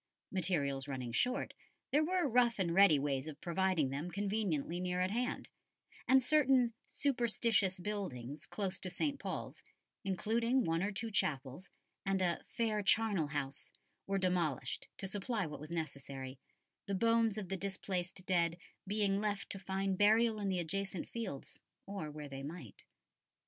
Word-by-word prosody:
Materials 145 -8 +1
running 130 -4 -4
short, 250 - +1 0.4
there 295 +3 +4
were 360 0 +2
rough 240 -2 +4
and 175 -4 +1
ready 190 -5 +7
ways 140 0 -1
of 150 -2 -7
providing 175 -5 +1
them 145 +6 -3
conveniently 195 -5 -1
near 180 0 -1
at 185 +1 +1
hand; 245 +3 -1 0.6
and 265 0 +6
certain 260 -4 +4
"superstitious 230 -7 +1
buildings" 160 - -4
close 190 -3 -2
to 185 - -1
St. 280 - -1
Paul's, - - -4 0.4
including 230 +7 +1
one 165 -2 +1
or 200 +2 0
two 225 +2 -3
chapels 140 -1 -1 0.3
and 195 -1 +1
a 175 -2 +1
"fair 220 -3 0
charnel 205 -5 +3
house" 145 -2 -4 0.4
were 195 0 +1
demolished 175 -8 0
to 195 - -3
supply 205 +2 -1
what 150 -2 -6
was 150 +1 -8
necessary, 140 -5 -5 0.5
the 200 - 0
bones 230 +1 +3
of 200 -4 -4
the 195 - -1
displaced 190 -1 -3
dead 170 -2 +2 0.3
being 200 -1 +2
left 205 -2 -2
to 195 - -4
find 190 0 -1
burial 220 +1 +5
in 200 -1 -1
the 185 - +1
adjacent 190 +2 -2
fields, 145 - -5 0.3
or 195 -6 -4
where 150 0 -7
they 135 -1 -7
might. 140 - -8
190 Hz, 155 wpm, -35 LUFS, 155-215 Hz, 0.6 s, ready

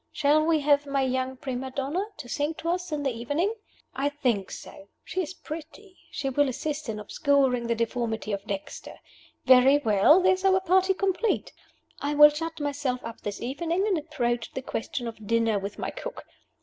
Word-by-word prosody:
Shall 300 +1 +3
we 315 -1 +2
have 290 0 +3
my 275 -1 +1
young 260 0 -1
prima 260 0 -4
donna 280 +8 -2
to - - -8
sing 295 +5 -1
to 335 - -4
us 360 0 -2
in 295 -1 -2
the 270 - +1
evening? 285 - -1 0.7
think 230 -9 +1
so. 195 - -10 0.2
She 370 - -2
is 365 +1 -5
pretty; 335 +6 -9
she 280 - -4
will 285 +1 +2
assist 300 +2 -4
in 215 -1 -3
obscuring 260 +1 +1
the 235 - +1
deformity 230 -1 -2
of 200 -1 -3
Dexter. 200 -2 -6 0.5
Very 260 +2 +7
well; 225 - +5
there 370 0 +4
is 370 0 -4
our 380 -1 +4
party 375 +1 +3
complete! 390 +3 0 0.5
I 290 +1 -2
will 295 0 +10
shut 320 +2 -5
myself 285 -3 -2
up 230 0 -8
this 205 -1 -5
evening 330 +9 -1
and 415 -3 +2
approach 245 -7 -2
the 265 - -5
question 240 0 -4
of 220 -2 -8
dinner 230 -2 +2
with 200 +1 -6
my - - -3
cook. - - -7
280 Hz, 185 wpm, -27 LUFS, 240-325 Hz, 0.7 s, will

